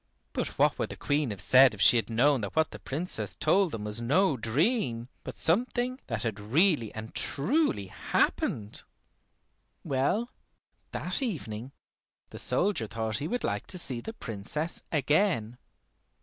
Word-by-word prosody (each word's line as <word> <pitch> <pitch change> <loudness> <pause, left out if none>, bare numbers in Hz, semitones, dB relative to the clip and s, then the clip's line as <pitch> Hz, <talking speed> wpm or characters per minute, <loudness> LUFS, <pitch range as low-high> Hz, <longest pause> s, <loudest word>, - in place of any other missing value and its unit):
But - - -3
what - - +3
would - - -1
the - - -7
Queen 145 -2 0
have 100 -3 -5
said 130 0 +6
if 100 - -7
she - - +7
had 115 -2 -1
known 125 +3 +3
that 100 - -5
what 160 0 +2
the - - -9
Princess 160 +7 -4
told 195 -3 +2
them 110 -5 -5
was 105 +2 -1
no 150 +7 +3
dream, 125 - 0
but - - -8
something 245 +8 0
that 115 -2 -3
had 110 -3 -3
really 130 - +2
and 110 0 -7
truly 210 - +1
happened? 105 +2 -1 1.0
Well, 145 - 0 0.6
that - - +3
evening 130 - -3 0.6
the - - -8
soldier 185 - 0
thought 110 -1 -3
he 150 - -3
would 245 +8 -2
like - - -2
to 185 - -3
see 130 -8 -2
the 225 - -7
Princess 150 - -4
again. 145 - +1
135 Hz, 155 wpm, -29 LUFS, 110-180 Hz, 1.0 s, she